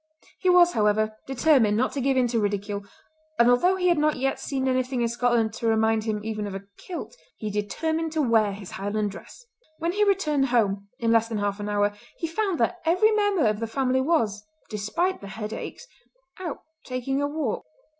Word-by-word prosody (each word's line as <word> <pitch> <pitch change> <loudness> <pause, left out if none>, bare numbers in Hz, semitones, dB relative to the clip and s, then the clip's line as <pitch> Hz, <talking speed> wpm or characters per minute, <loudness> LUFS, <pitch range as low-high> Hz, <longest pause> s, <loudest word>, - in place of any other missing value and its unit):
He 370 - +1
was, 355 -1 +6
however, 215 -1 +1
determined 260 -6 +3
not 255 - +1
to 280 - -3
give 270 +1 +2
in 255 - +4
to 230 -1 +1
ridicule, 205 0 -2 0.5
and 235 +1 +6
although 355 +10 +4
he 365 -1 0
had 340 -3 +3
not 305 0 +2
yet 270 +1 -1
seen 265 -2 -2
anything 255 -1 0
in - - +2
Scotland 235 -2 +1
to 230 - -3
remind 220 0 +2
him 215 -2 -1
even 215 -2 -3
of 195 - -6
a 195 - -6
kilt, 365 +6 -7 0.2
he 215 -1 -4
determined 315 +11 -2
to 315 - +1
wear 225 -4 +3
his 195 -1 -9
Highland 205 +1 -2
dress. - - -12 0.3
When 335 +1 -1
he 415 +3 +2
returned 305 -9 +2
home, 200 -5 +1
in 230 -2 +1
less 230 0 +4
than 225 -2 -3
half 205 0 -1
an 205 0 -4
hour, 205 0 +1 0.2
he - - -3
found 365 +1 -1
that 240 +10 +1
every 365 +7 +4
member 410 - +2
of 210 -1 +1
the 230 - -2
family 260 +2 +1
was, 230 -9 +1 0.3
despite 215 - -1
the 200 - -8
headaches, 215 - -6 0.5
out 340 -6 -5 0.2
taking 260 +2 -2
a 285 - +1
walk. 290 -6 -2
240 Hz, 200 wpm, -25 LUFS, 210-315 Hz, 0.5 s, was